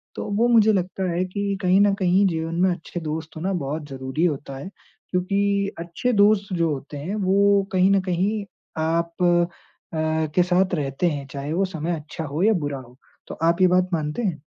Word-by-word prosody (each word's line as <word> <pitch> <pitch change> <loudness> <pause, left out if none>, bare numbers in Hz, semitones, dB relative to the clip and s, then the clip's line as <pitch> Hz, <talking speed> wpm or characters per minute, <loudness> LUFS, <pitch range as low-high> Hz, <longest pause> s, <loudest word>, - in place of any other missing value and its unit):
तो - - -4
वो 235 +2 +4
मुझे 220 -2 +5
लगता 185 0 -1
है 175 +2 0
कि 200 +1 -2
कहीं 185 +1 +4
न 205 -1 +4
कहीं 185 +2 +3
जीवन 165 -1 -2
में 190 - +4
अच्छे 175 +1 -5
दोस्त 160 +1 -5
होना 185 +5 -2
बहुत 150 -1 -3
ज़रूरी 130 +5 -2
होता 140 -4 -2
है, 165 +8 -7 0.4
क्योंकि 200 +2 0
अच्छे 170 +9 -2
दोस्त 205 -1 +3
जो 165 -1 +1
होते 145 +2 -7
हैं 175 +9 -4
वो 200 +1 +4
कहीं 185 +1 +4
न 195 -1 +4
कहीं 190 +4 -1 0.4
आप 170 +1 0
अ, 160 -2 -1
के 180 - +5
साथ 185 +1 +1
रहते 145 +3 -1
हैं 145 -3 -4
चाहे 140 +2 -4
वो 195 +3 +2
समय 170 -1 -3
अच्छा 155 +1 -7
हो 150 +5 -2
या 220 - +5
बुरा 145 -7 -2
हो। 125 0 -15 0.3
तो - - -7
आप 170 +3 +2
ये 185 - +7
बात 180 0 +2
मानते 155 +6 -1
हैं? 160 -7 -2
175 Hz, 200 wpm, -23 LUFS, 155-195 Hz, 0.4 s, ये